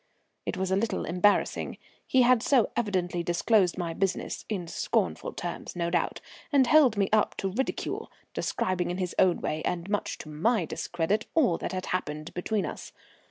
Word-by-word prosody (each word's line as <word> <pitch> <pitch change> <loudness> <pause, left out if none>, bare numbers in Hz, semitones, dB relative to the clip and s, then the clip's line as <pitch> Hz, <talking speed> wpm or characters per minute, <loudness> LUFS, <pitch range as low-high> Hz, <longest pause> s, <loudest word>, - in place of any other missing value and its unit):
It - - -2
was 190 0 -1
a - - +4
little 220 +3 -1
embarrassing; 180 +4 +1 0.3
he 260 -1 +5
had 245 -1 +5
so 245 -3 +3
evidently 185 -6 0
disclosed 180 +2 +2
my 170 -2 -2
business, 190 +1 -2
in 190 -6 -3
scornful - - -1
terms - - -6
no 170 -1 -1
doubt, 175 - 0 0.3
and 275 -3 +5
held 260 -5 +5
me 200 -1 +3
up 215 -1 +3
to 195 - -2
ridicule, 260 +7 -3 0.2
describing 180 -2 -1
in 175 - -2
his 180 -2 -2
own 180 -2 +4
way 155 +1 -2
and 175 0 -2
much 205 - -1
to 155 - -9
my 180 +6 +1
discredit 175 +6 -1
all 255 - +3
that - - -3
had 185 0 -3
happened 155 -3 -3
between 200 +4 -1
us. - - -7
185 Hz, 175 wpm, -28 LUFS, 175-220 Hz, 0.3 s, he